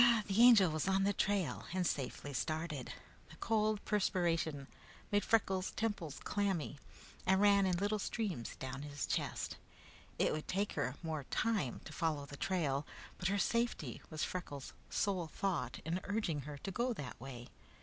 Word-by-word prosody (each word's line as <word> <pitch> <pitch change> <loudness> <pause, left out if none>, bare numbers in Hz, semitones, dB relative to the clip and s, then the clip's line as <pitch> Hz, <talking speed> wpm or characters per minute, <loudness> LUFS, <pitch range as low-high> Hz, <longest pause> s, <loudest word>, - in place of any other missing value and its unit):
The 200 +3 +3
Angel 225 -8 +8
was 155 +3 -1
on 195 0 +3
the 200 +1 +3
trail 200 -4 0
and 185 -1 +1
safely 145 -1 -2
started. 155 -1 -2 0.4
The 160 - -12
cold 215 +2 +1
perspiration 165 -7 +1 0.5
made 205 0 +3
Freckles' 190 -4 +2
temples 205 -10 -2
clammy 190 -8 -1 0.5
and 190 0 +5
ran 200 -1 +6
in 180 -2 +2
little 205 +3 +1
streams 195 - -2
down 130 +1 -5
his 145 0 -3
chest. - - -2 0.6
It - - +3
would 155 0 -4
take 200 +2 0
her 125 +2 -1
more 155 -4 -3
time 205 - 0
to - - -8
follow 155 -4 0
the 140 - -9
trail, 145 -5 0 0.4
but 180 - +1
her 200 +2 +2
safety 200 - 0
was 155 -1 -2
Freckles' 145 -7 -4 0.2
sole 185 -5 0
thought 195 +2 -2
in 170 +3 0
urging 200 -8 0
her 145 - -6
to 195 - -5
go 240 +6 0
that 130 - -7
way. 125 -2 -8
180 Hz, 160 wpm, -36 LUFS, 145-205 Hz, 0.6 s, Angel